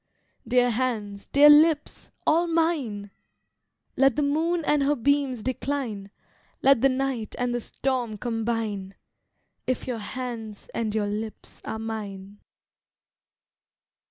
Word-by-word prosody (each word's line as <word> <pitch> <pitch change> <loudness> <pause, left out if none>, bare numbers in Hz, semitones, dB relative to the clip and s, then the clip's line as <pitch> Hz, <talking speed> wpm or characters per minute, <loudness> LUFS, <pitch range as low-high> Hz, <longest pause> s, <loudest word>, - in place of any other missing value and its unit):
Dear 245 0 +3
hands, 215 -5 -2
dear 290 +1 +7
lips, 300 0 +3 0.2
all 335 +3 +3
mine! 295 -12 0 0.8
Let 270 -2 +4
the 295 - +1
moon 320 +3 0
and 295 -1 +3
her 285 +2 +2
beams 275 -2 +1
decline, 255 -6 -3 0.5
Let 270 -4 +5
the 270 - +5
night 260 -4 -2
and 245 0 -1
the 240 - -1
storm 245 -3 -2
combine, 225 -4 -3 0.7
If 255 -1 -1
your 245 -3 -3
hands 225 -2 -6
and 220 -2 -2
your 215 -1 +1
lips 215 +1 -6
are - - -4
mine. 205 -3 -6
245 Hz, 120 wpm, -26 LUFS, 215-280 Hz, 0.8 s, dear